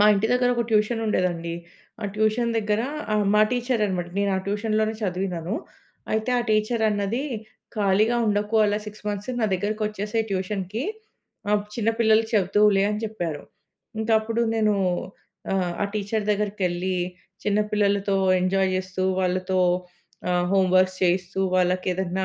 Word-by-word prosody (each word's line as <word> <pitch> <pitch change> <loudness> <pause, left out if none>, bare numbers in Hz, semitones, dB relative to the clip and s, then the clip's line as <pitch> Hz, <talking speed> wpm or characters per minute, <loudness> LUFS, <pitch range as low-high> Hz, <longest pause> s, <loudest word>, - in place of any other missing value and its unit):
మా 210 - +7
ఇంటి 205 +3 +1
దగ్గరొక 245 -1 +2
ట్యూషనుండేదండి. 210 -6 +1 0.5
ఆ - - -3
ట్యూషన్ 220 +2 +1
దగ్గర 210 0 0 0.3
ఆహ్, 210 -1 +2
మా 210 - +5
టీచరన్నమాట. 215 -8 0
నేను 200 0 +1
ఆ - - +1
ట్యూషన్‌లోనే 215 +1 0
చదివినను. 180 -1 -2 0.6
అయితే, 220 +3 0
ఆ - - +1
టీచర్ 215 +2 +1
అన్నది, 205 +5 -1 0.5
"ఖాళీగా 210 +4 +3
ఉండకు 210 +1 0
అలా 210 0 +1
6 210 0 -10
మంత్స్. 205 +4 -3
నా - - +2
దగ్గరకొచ్చేసేయి 210 +2 -2
ట్యూషన్‌కి. 195 - -2 0.7
ఆహ్, 210 -1 +3
చిన్న 225 -1 -1
పిల్లలకి 220 0 +4
చెప్తువులే" 200 +1 +4
అని 210 - -2
చెప్పారు. 175 -9 -4 0.6
ఇంకా 220 +1 0
అప్పుడు 230 +1 -2
నేను 215 -2 +2 0.8
ఆహ్, 180 -2 0
ఆ - - +3
టీచర్ 210 +1 -1
దగ్గరికెళ్లి 190 -3 -1 0.5
చిన్న 205 0 +1
పిల్లలతో 200 -1 +1 0.2
ఎంజాయ్ 190 +1 +2
చేస్తూ, 185 0 -3 0.2
వాళ్ళతో 185 0 0 0.7
ఆహ్, 180 0 +1
హోమ్‌వర్క్స్ 185 -1 +3
చేయిస్తూ, 180 +1 +1 0.2
వాళ్ళకేదైనా 185 +1 0
205 Hz, 130 wpm, -24 LUFS, 185-215 Hz, 0.8 s, మా